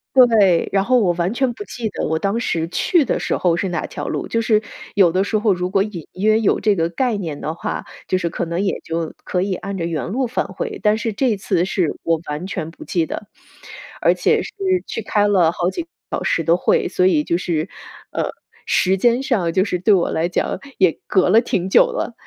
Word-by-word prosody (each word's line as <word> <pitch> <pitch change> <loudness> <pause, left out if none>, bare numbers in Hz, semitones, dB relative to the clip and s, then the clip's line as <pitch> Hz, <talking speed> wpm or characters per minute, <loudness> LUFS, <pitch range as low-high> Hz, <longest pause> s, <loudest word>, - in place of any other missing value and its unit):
对， 220 -9 +5
然 195 -1 +2
后 250 +3 +3
我 185 -6 +3
完 175 +3 -1
全 260 +1 +1
不 415 - -7
记 235 - -4
得 - - -3
我 160 +1 0
当 200 +5 -1
时 165 -8 -1
去 340 - +2
的 265 - 0
时 - - -1
候 170 -2 +2
是 190 +2 -1
哪 170 -3 -2
条 - - -6
路， - - -3
就 230 0 0
是 215 -1 +3 0.3
有 190 -4 +5
的 185 +3 +1
时 215 - 0
候 210 -3 +2
如 180 0 -3
果 195 0 +3
隐 195 -6 -6
约 215 +3 +2
有 225 - +2
这 210 -2 +2
个 165 -1 0
概 235 +5 0
念 160 -7 -5
的 155 +2 -3
话， - - -4 0.2
就 185 - +1
是 170 - -1
可 170 - -3
能 170 +2 -3
也 200 - 0
就 165 -1 -3
可 180 - -1
以 190 0 0
按 195 +1 -5
着 165 - -2
原 160 -4 -2
路 250 +7 -1
返 245 - -1
回， 450 -5 -5
但 210 +1 +3
是 225 -2 -2
这 245 +1 +1
次 185 -3 0
是 180 -4 -1
我 165 -1 +1
完 150 +5 -4
全 165 -5 -4
不 165 - -12
记 165 -3 0
得， 210 - -6 0.8
而 - - +5
且 - - +2
是 - - -8 0.3
去 - - -4
开 205 -1 +1
了 185 -5 +4
好 175 +1 -1
几 345 - -4
个 330 - -19 0.2
小 - - -2
时 165 - 0
的 170 +3 +3
会， - - +2
所 185 - +2
以 155 -5 +3
就 170 - 0
是 165 -2 -1 0.4
呃， - - -2 0.4
时 190 +1 +2
间 240 +4 +3
上 210 -11 0
就 185 +3 +2
是 180 -4 -2
对 200 +4 +4
我 180 - +1
来 165 +2 0
讲 180 - -1 0.2
也 185 -4 +4
隔 185 -2 +3
了 225 - +6
挺 190 -5 -2
久 - - +7
了。 - - -3
190 Hz, 255 characters per minute, -20 LUFS, 170-215 Hz, 0.8 s, 久